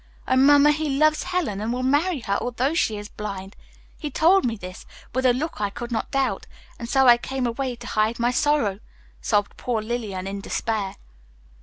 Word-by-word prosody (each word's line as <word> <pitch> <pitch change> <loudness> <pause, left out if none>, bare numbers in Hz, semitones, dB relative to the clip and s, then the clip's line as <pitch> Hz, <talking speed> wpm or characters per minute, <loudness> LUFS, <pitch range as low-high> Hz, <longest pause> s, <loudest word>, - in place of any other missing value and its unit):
Oh, 260 - +2
Mamma, 285 +2 +6
he 310 0 -1
loves 310 +1 +3
Helen, 350 - -2
and 220 +2 -2
will 250 +1 -2
marry 290 +3 +1
her 200 -3 -1
although 250 +4 -1
she 220 -10 +1
is 205 0 -7
blind. 195 -2 -7 0.4
He 300 - -4
told 340 +6 +4
me 230 -2 0
this, 185 -3 -10 0.3
with 260 +1 +2
a - - +6
look 270 0 -3
I 205 - +1
could 240 +4 -7
not 225 - -2
doubt, 275 -2 -1 0.3
and 235 -1 -6
so 270 0 +4
I 240 -1 +8
came 260 +1 -3
away 245 +1 -2
to - - -12
hide 215 +2 0
my 240 +1 +1
sorrow," 250 -7 +1 0.4
sobbed 205 -1 0
poor 240 -3 -1
Lillian 215 -4 -4
in 200 +1 -5
despair. 205 -2 -2
240 Hz, 195 wpm, -24 LUFS, 210-280 Hz, 0.4 s, I